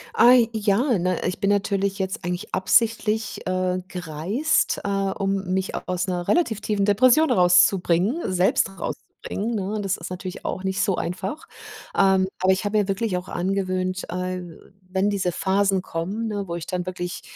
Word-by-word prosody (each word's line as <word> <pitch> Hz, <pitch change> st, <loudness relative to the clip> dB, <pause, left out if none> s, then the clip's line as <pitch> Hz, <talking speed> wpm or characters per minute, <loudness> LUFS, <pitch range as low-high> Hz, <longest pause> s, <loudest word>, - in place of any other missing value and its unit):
Ah, 245 Hz, +1 st, +7 dB, 0.2 s
ja, 220 Hz, +3 st, +2 dB
ne? 180 Hz, 0 st, -1 dB
Ich 180 Hz, -, -3 dB
bin 200 Hz, 0 st, +1 dB
natürlich 200 Hz, -1 st, 0 dB
jetzt 190 Hz, +3 st, -3 dB
eigentlich 180 Hz, +4 st, -4 dB
absichtlich, 220 Hz, +2 st, +1 dB
äh, 185 Hz, 0 st, 0 dB
gereist, 180 Hz, -, -1 dB
äh, -, -, -3 dB
um 195 Hz, -1 st, -1 dB
mich 190 Hz, 0 st, -1 dB
aus 180 Hz, +1 st, -1 dB
'ner 175 Hz, -1 st, -3 dB
relativ 275 Hz, -, +1 dB
tiefen 205 Hz, -2 st, 0 dB
Depression 255 Hz, +9 st, +4 dB
rauszubringen 180 Hz, -, +3 dB
selbst 185 Hz, +1 st, +2 dB
rauszubringen, 220 Hz, +5 st, -5 dB
ne? 200 Hz, 0 st, -2 dB
Und 210 Hz, -1 st, -2 dB
das 195 Hz, -1 st, -1 dB
ist 165 Hz, -, -7 dB
natürlich 185 Hz, 0 st, -7 dB
auch 185 Hz, -, -3 dB
nicht 190 Hz, 0 st, -1 dB
so 195 Hz, -, +2 dB
einfach. 190 Hz, -, -4 dB, 0.5 s
Ähm, 190 Hz, -1 st, +4 dB
aber 185 Hz, +1 st, +3 dB
ich 190 Hz, -, -3 dB
habe 205 Hz, +1 st, +1 dB
mir 205 Hz, -, 0 dB
wirklich 195 Hz, -1 st, -1 dB
auch 180 Hz, +1 st, -6 dB
angewöhnt, 185 Hz, 0 st, -1 dB
äh, 185 Hz, 0 st, -3 dB, 0.5 s
wenn 190 Hz, +2 st, +1 dB
diese 195 Hz, -3 st, 0 dB
Phasen 195 Hz, +1 st, +1 dB
kommen, 190 Hz, +6 st, -4 dB
ne, 205 Hz, -2 st, -3 dB
wo 170 Hz, -, -4 dB
ich 170 Hz, -2 st, -5 dB
dann 180 Hz, -1 st, -3 dB
wirklich, 180 Hz, -1 st, -5 dB
190 Hz, 170 wpm, -23 LUFS, 180-205 Hz, 0.5 s, Ah